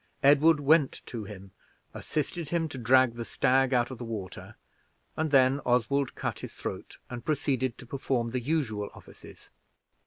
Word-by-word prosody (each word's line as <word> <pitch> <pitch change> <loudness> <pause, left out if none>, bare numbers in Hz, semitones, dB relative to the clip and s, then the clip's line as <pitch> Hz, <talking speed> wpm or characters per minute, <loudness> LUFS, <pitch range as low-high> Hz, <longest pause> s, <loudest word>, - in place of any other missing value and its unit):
Edward 145 +3 +6
went 145 0 +3
to 115 -4 -6
him, 100 -2 -10 0.4
assisted 155 +1 -3
him 165 -1 0
to 130 - -7
drag 130 0 +4
the 120 0 -5
stag 130 +3 +2
out 120 -1 +2
of 125 - -8
the - - -5
water, 110 -6 -7 0.6
and 160 0 -1
then 135 0 +4
Oswald 125 +3 +1
cut - - -4
its - - -7
throat, - - -6
and 120 -1 -7
proceeded 130 -5 -1
to - - -11
perform 120 -2 -2
the 125 0 -2
usual 115 -8 -1
offices. - - -15
130 Hz, 160 wpm, -28 LUFS, 120-145 Hz, 0.6 s, Edward